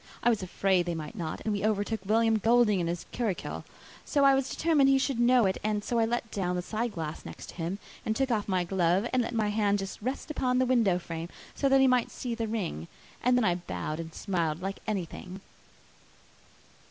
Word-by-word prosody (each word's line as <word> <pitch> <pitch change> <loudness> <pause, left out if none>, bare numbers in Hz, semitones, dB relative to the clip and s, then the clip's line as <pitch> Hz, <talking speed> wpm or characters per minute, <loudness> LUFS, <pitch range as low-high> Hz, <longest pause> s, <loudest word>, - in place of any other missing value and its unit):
I 240 - +5
was 220 - 0
afraid 185 -1 +1
they 170 - -1
might 155 -2 -6
not; 160 -3 -4
and 215 - -1
we 200 - -2
overtook 215 +1 0
William 225 +1 +3
Goulding 225 -2 +4
in 170 - -1
his 170 0 -3
curricle, 225 -7 -3 0.4
so 285 -2 +1
I 275 - +7
was 270 -1 +1
determined 305 -4 +3
he 270 - +5
should 265 -2 0
know 240 -1 +5
it, 190 -1 0
and 210 -1 0
so 235 +2 0
I 225 - +4
let 230 0 -2
down 180 -3 -1
the 180 - -2
side 225 +3 -2
glass 160 -2 -5
next - - -9
to - - -9
him, 175 +3 -2 0.3
and 220 - -1
took 270 0 0
off 215 -3 0
my 185 -2 +1
glove 180 +3 +1
and 255 - +3
let 230 - -3
my 215 -2 +1
hand 205 -1 +2
just 195 +1 -6
rest 260 +7 -3
upon 250 -4 0
the 255 - +3
window 230 -8 +3
frame, 165 -1 -6 0.2
so 275 - +1
that 270 0 +5
he - - +6
might 250 -2 +3
see 245 -2 -4
the 230 -1 -2
ring, 180 - -3 0.4
and 250 0 +4
then 245 - +2
I 180 - +3
bowed 170 -3 -4
and 165 0 -6
smiled 165 -4 -1
like 195 +2 -4
anything." 190 -2 -4
210 Hz, 225 wpm, -29 LUFS, 180-240 Hz, 0.4 s, I